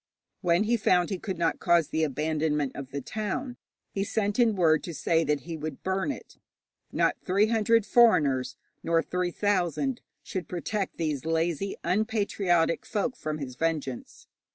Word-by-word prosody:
When 175 +1 +3
he 235 +2 +2
found 180 -4 +2
he 190 - -2
could 190 -2 -4
not 165 -1 0
cause 170 -3 +3
the 160 - 0
abandonment 150 -1 0
of 135 -2 -7
the 140 +1 -4
town, 215 - -4 0.3
he 195 - -1
sent 205 +1 -1
in 230 -3 +4
word 160 -4 +4
to 170 - -6
say 165 +1 +2
that 150 -2 0
he 165 0 -6
would 155 0 -6
burn 190 +8 0
it. - - -10 0.5
Not - - +1
three 195 +3 +3
hundred 225 -1 +3
foreigners, 140 - +4 0.3
nor 165 0 +2
three 180 0 -1
thousand, 205 - 0 0.2
should 185 -4 -5
protect 195 +3 -3
these 155 -5 -2
lazy, 165 +3 -1
unpatriotic 200 -5 +1
folk 240 +4 -2
from 155 -6 -4
his 135 -4 -6
vengeance. 150 -4 -3
175 Hz, 160 wpm, -27 LUFS, 155-205 Hz, 0.5 s, in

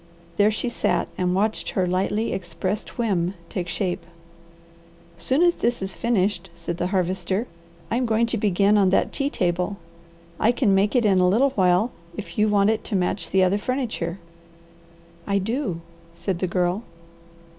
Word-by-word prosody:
There 205 +1 +5
she 220 +3 -2
sat 240 - 0
and 180 0 0
watched 215 +3 0
her 185 - 0
lightly 195 +5 0
expressed 185 +3 -4
whim 195 -6 0
take 180 -3 -3
shape. 180 +1 -2 1.2
"Soon 265 - +2
as 350 -1 +5
this 240 +1 0
is 190 0 -1
finished," 195 -5 0
said 170 0 -5
the 175 - -1
Harvester, 185 +2 0 0.5
"I 230 - +2
am 250 -1 0
going 225 +1 +3
to 230 0 -2
begin 205 +1 +3
on 195 -2 +4
that 190 - +1
tea 275 0 0
table. 180 -1 -1 0.6
I 230 +3 +4
can 235 -6 +2
make 200 +5 +2
it 240 -3 +3
in 195 -3 +4
a 180 0 +4
little 260 +8 +3
while, 190 +1 +3 0.3
if 210 - -7
you 215 - +4
want 205 0 +4
it 220 - -2
to 215 - -3
match 180 -2 0
the 190 0 +3
other 190 +3 +2
furniture." 225 -9 -2 1.1
"I 200 -1 +2
do," 200 - -2 0.3
said 170 +1 -3
the 185 - 0
Girl. 180 +3 0
195 Hz, 170 wpm, -24 LUFS, 180-220 Hz, 1.2 s, There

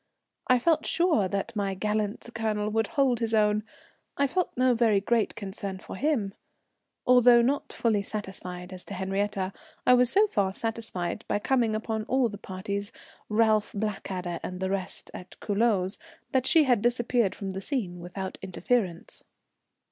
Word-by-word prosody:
I 255 - +5
felt 310 +4 +2
sure 330 - +3
that 200 +4 -3
my 200 -2 -1
gallant 210 +2 -2
Colonel 215 -2 -1
would 225 0 +1
hold 265 -4 +2
his 225 -1 0
own, 210 0 +3 0.5
I 280 - +3
felt 355 +6 0
no 255 0 +4
very 225 -4 +3
great 225 +2 +1
concern 195 -2 -5
for - - -9
him. 235 -6 0 0.7
Although 245 -1 +7
not 275 +4 0
fully 220 -3 +1
satisfied 190 -3 -6
as 185 - -9
to 200 - -7
Henriette, 195 0 -1 0.3
I 250 - +7
was 250 -1 +5
so 410 +2 +5
far 200 - 0
satisfied 225 -3 -2
by - - +1
coming 230 0 +1
upon 220 0 -2
all 260 -1 +2
the 205 -1 -8
parties, 200 +2 -4 0.4
Ralph, 215 -1 +2
Blackadder, 190 -4 -3
and 180 0 -5
the 190 0 -1
rest, 195 -2 -4
at 180 - -10
Culoz, 205 -3 +1 0.3
that 260 -1 +2
she 325 -3 +6
had 245 -6 +3
disappeared 240 -2 +1
from 195 -1 -5
the 190 0 -5
scene 195 -8 -2
without 185 +2 -6
interference. 190 -1 -2
215 Hz, 160 wpm, -27 LUFS, 195-240 Hz, 0.7 s, Although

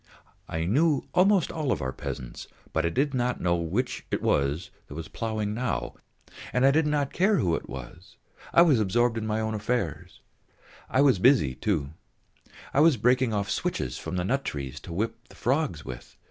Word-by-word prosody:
I 80 0 -2
knew 145 - +2
almost 190 0 +4
all 150 -5 -1
our 65 0 -3
peasants, 65 -1 -6 0.3
but 80 +1 +1
I - - +1
did 140 - 0
not 125 -1 0
know 85 -1 +2
which 100 +10 -2
it - - 0
was 70 +5 0 0.4
ploughing 110 -2 -2
now, 125 +2 -2 0.6
and 125 +1 +2
I 135 - +7
did 155 +1 +2
not 145 -2 0
care 205 +4 +3
who 90 - +1
it - - -3
was, 70 +8 -10 0.3
I 170 - +7
was 150 -9 +4
absorbed 115 +4 +2
in 110 - -4
my 110 0 0
own 110 0 -1
affairs. 110 - -3 0.7
I 130 - +3
was 135 -9 +4
busy, 115 - +4
too; 70 0 -1 0.8
I - - +3
was 155 -3 +6
breaking 125 +2 +3
off 100 -1 -1
switches 60 - -2
from - - -5
the 90 -1 -1
nut 135 +7 0
trees 70 -3 -5
to - - -10
whip 105 +7 -3
the - - -15
frogs 130 - -1
with. 60 -2 -9
110 Hz, 180 wpm, -27 LUFS, 85-135 Hz, 0.8 s, I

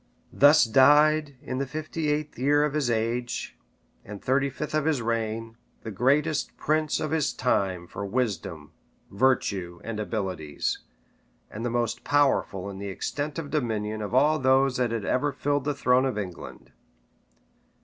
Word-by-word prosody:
Thus 145 +3 +6
died, 145 +4 +4
in 130 -2 -4
the 140 - -2
fifty 155 +2 -3
eighth 150 -3 -2
year 145 +3 +3
of 150 -1 0
his 150 -5 0
age, 120 +2 -2 0.5
and 105 0 -9
thirty 135 +4 +1
fifth 150 +3 -6
of 155 -1 +1
his 155 -4 +1
reign, 115 0 -3 0.3
the 110 - -5
greatest 140 - +1
prince 155 0 0
of 155 - -3
his 160 -3 +1
time 95 -7 0
for 95 - -7
wisdom, 100 - -3 0.4
virtue, 100 -7 0
and 115 -2 -5
abilities, 95 -9 -3 0.7
and 110 - -6
the 120 - -1
most 120 -1 -1
powerful 135 -9 +1
in 100 -1 -7
the 100 0 -5
extent 145 - -4
of 150 -4 -5
dominion 110 -7 -2
of 105 +3 -3
all 150 +4 +4
those 130 0 +3
that 125 -1 +1
had 115 -3 -3
ever 145 +3 +1
filled 145 0 -1
the 145 -1 -1
throne 130 -1 +3
of 130 - -3
England. 95 -4 -7
125 Hz, 160 wpm, -26 LUFS, 110-145 Hz, 0.7 s, Thus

